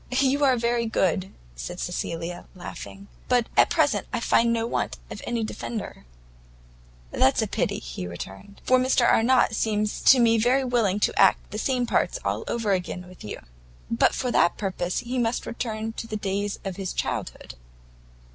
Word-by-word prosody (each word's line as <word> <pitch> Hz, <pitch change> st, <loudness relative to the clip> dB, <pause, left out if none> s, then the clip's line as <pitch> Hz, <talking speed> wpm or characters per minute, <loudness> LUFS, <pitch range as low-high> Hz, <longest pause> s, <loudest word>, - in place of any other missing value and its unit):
"You 275 Hz, +2 st, +2 dB
are 260 Hz, -2 st, +4 dB
very 235 Hz, 0 st, 0 dB
good," 190 Hz, -3 st, 0 dB, 0.2 s
said -, -, -6 dB
Cecilia, 170 Hz, +1 st, -4 dB
laughing, 195 Hz, +2 st, -9 dB, 0.2 s
"but 245 Hz, -2 st, +3 dB
at -, -, +5 dB
present -, -, +1 dB
I -, -, -1 dB
find 235 Hz, 0 st, +3 dB
no 230 Hz, -1 st, 0 dB
want 235 Hz, -, -2 dB
of -, -, -7 dB
any 235 Hz, -1 st, -1 dB
defender." 215 Hz, -, -6 dB, 1.1 s
"That's -, -, +3 dB
pity," -, -, 0 dB
he -, -, -6 dB
returned, 95 Hz, -, -9 dB
"for 255 Hz, 0 st, +4 dB
Mr 255 Hz, -1 st, +3 dB
Arnott 240 Hz, 0 st, +4 dB
seems 215 Hz, -1 st, -1 dB
to 265 Hz, -, +8 dB
me 230 Hz, -1 st, +4 dB
very 250 Hz, +4 st, +3 dB
willing 230 Hz, -6 st, +1 dB
to -, -, +1 dB
act 195 Hz, -, +4 dB
the 210 Hz, -, -4 dB
same 250 Hz, 0 st, 0 dB
parts 240 Hz, -, +1 dB
over 225 Hz, -3 st, -1 dB
again 180 Hz, -1 st, -2 dB
with 185 Hz, 0 st, -14 dB
you." 105 Hz, -, -7 dB, 0.5 s
"But 115 Hz, -, +3 dB
for 250 Hz, -2 st, -1 dB
that 175 Hz, -, +3 dB
purpose 185 Hz, -3 st, -2 dB
he 250 Hz, +1 st, -3 dB
must 235 Hz, 0 st, 0 dB
return 225 Hz, -2 st, -4 dB
to 230 Hz, -, -6 dB
the 215 Hz, -, -3 dB
days 200 Hz, 0 st, -2 dB
of 190 Hz, -2 st, -4 dB
his 195 Hz, -2 st, -3 dB
childhood." -, -, -4 dB
220 Hz, 165 wpm, -25 LUFS, 190-240 Hz, 1.1 s, to